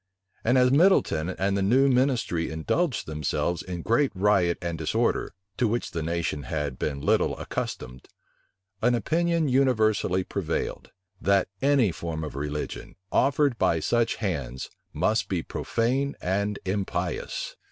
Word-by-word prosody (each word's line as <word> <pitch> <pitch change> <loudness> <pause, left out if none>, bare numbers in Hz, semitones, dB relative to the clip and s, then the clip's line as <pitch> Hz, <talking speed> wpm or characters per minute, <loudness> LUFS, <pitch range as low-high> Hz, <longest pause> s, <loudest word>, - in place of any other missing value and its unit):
And 120 +3 +3
as 125 0 +5
Middleton 140 - +3
and 95 +1 0
the 100 - 0
new 125 +8 +4
ministry 125 -10 +1
indulged 115 - -1
themselves 75 +3 -1
in 90 -2 -6
great 125 +5 +2
riot 95 -3 +3
and 85 -1 -3
disorder, 80 +3 0 0.2
to 120 - +2
which 120 +3 -2
the 85 - -3
nation 80 -2 -2
had 70 -1 -3
been 70 -2 -2
little - - +2
accustomed, 65 0 -5 0.7
an 120 +2 +3
opinion 165 +7 +1
universally 110 -8 +2
prevailed, 90 -4 -3 0.3
that 100 -1 +2
any 135 -7 +4
form 80 -1 -5
of 75 - -6
religion, 75 +1 -5 0.2
offered 140 -2 +2
by 90 -4 +3
such 120 +8 +1
hands, 70 - -4 0.2
must 105 -2 0
be 90 -4 -1
profane 130 +5 -1
and 100 +3 -1
impious. 95 -2 -3
100 Hz, 135 wpm, -26 LUFS, 80-125 Hz, 0.7 s, as